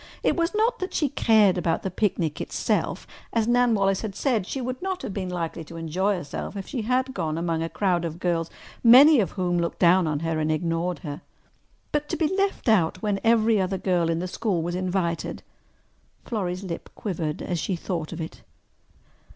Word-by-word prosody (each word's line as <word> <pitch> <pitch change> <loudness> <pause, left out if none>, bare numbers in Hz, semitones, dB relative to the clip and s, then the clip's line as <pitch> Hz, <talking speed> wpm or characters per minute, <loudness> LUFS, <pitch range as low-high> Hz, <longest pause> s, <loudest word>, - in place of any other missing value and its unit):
It - - +2
was 340 +3 0
not 465 +3 +2
that 370 - -4
she 295 - +1
cared 210 -7 +4
about 165 -2 0
the 190 - -2
picnic 175 -6 -1
itself: - - -1 0.3
as 230 -1 +1
Nan 245 -1 +4
Wallace 195 -1 +1
had 210 -4 -5
said, 225 -6 0
she 270 - -3
would 255 0 -4
not 375 0 -3
have 200 - -4
been 185 -2 -3
likely 170 -2 -3
to 165 - -10
enjoy 180 +5 0
herself 175 +4 -5
if 195 - -5
she 260 -5 -3
had 255 +4 0
gone 160 -6 -2
among 165 -1 -1
a 165 - -2
crowd 180 -3 0
of 165 -1 -4
girls 170 -2 0 0.3
many 265 +5 +8
of 200 - 0
whom 175 -2 0
looked 170 0 -2
down 180 0 +4
on 150 -1 -1
her 165 -1 -1
and 155 0 0
ignored 165 +2 -1
her. 145 0 -5 0.7
But 295 0 -1
to - - -1
be 330 +3 +1
left 395 -7 -1
out 180 -5 +2
when 205 -2 0
every 225 -2 +4
other 190 +1 -1
girl 175 -3 +1
in 165 - +1
the 180 +2 -2
school 180 -2 -1
was 175 +1 -3
invited! 180 -2 -2 0.8
Florrie's 185 -4 -3
lip 175 -3 -6
quivered 160 -7 -3
as 175 -2 -2
she 190 - -1
thought 170 -2 -4
of 170 - -6
it. 160 0 -7
185 Hz, 200 wpm, -25 LUFS, 170-225 Hz, 0.8 s, many